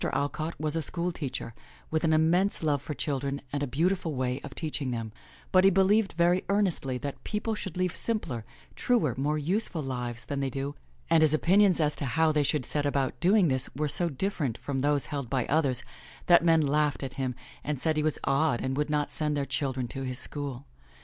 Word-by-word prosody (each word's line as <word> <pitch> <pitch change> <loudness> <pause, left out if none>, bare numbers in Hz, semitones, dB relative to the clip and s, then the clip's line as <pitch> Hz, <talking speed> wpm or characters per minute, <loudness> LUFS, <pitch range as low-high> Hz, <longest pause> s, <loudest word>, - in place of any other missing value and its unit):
Alcott 155 +3 -2
was 155 0 +1
a 165 - 0
school 170 +4 -2
teacher 135 -7 -5 0.4
with 160 +1 0
an 160 - +3
immense 165 +5 +2
love 145 -3 +1
for 150 +1 -5
children 140 -1 -2
and 145 - -1
a 145 - 0
beautiful 165 +3 0
way 130 0 -1
of 140 -2 -8
teaching 150 -4 -3
them, 115 -3 -3 0.4
but 185 0 +5
he 195 - +7
believed 195 +2 +3
very 175 +2 +3
earnest 200 -3 +1
ly 130 -1 -1
that 140 +2 -6
people 220 +1 -2
should 190 -5 -6
lead 180 -1 +1
simpler, 165 - -2 0.3
truer, 225 - +2
more 145 +4 0
useful 170 +1 0
lives 125 -3 -3
than 140 -1 -3
they 135 -1 0
do, 135 +2 -3 0.3
and 165 -1 +4
his 155 -1 +4
opinions 190 +3 +4
as 150 -1 +1
to 145 - -4
how 160 +5 +2
they 150 -1 +2
should 145 -2 0
set 145 - -1
about 140 -2 -1
doing 185 +2 +4
this 130 -3 0
were 150 +2 0
so 170 +4 +2
different 145 - -2
from 140 -2 -3
those 145 +1 +2
held 140 -5 -3
by 130 -2 0
others 140 -5 +1 0.4
that 170 -1 +6
men 165 -1 +5
laughed 150 -1 +1
at 135 -1 -5
him 130 -3 -2 0.3
and 145 -2 -2
said 160 +3 +1
he 155 - +1
was 155 0 +1
odd 135 -3 +2
and 130 0 -2
would 150 0 0
not 150 -1 0
send 150 -1 -1
their 140 - 0
children 130 -3 -2
to 135 +3 -6
his 130 -1 -2
school. 140 -2 -3
150 Hz, 215 wpm, -28 LUFS, 135-170 Hz, 0.4 s, he